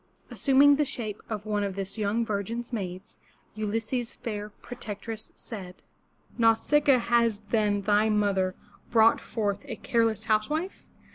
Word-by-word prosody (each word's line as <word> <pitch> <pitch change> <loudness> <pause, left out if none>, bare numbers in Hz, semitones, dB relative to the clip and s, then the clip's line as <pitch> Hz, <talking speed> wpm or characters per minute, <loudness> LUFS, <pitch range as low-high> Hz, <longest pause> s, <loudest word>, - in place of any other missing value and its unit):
Assuming 280 +1 +5
the 300 - +3
shape 235 -7 -4
of 215 -2 -4
one 210 -1 0
of 195 -2 -3
this 195 -1 -3
young 220 +2 0
virgin's 225 +4 -3
maids, 190 -3 -5 0.3
Ulysses' 225 +3 -2
fair 210 -2 -5
protectress 220 0 -7
said: 190 -5 -9 0.6
''Nau 225 -1 +6
sic'a 290 +3 +3
a, - - +2
has 235 -3 +2
then 210 -3 +2
thy 210 +2 +3
mother 200 -3 +1 0.3
brought 225 -1 +5
forth 205 -3 -2
a - - -5
careless 225 -2 0
housewife? 300 - -1
220 Hz, 140 wpm, -27 LUFS, 205-235 Hz, 0.6 s, Nau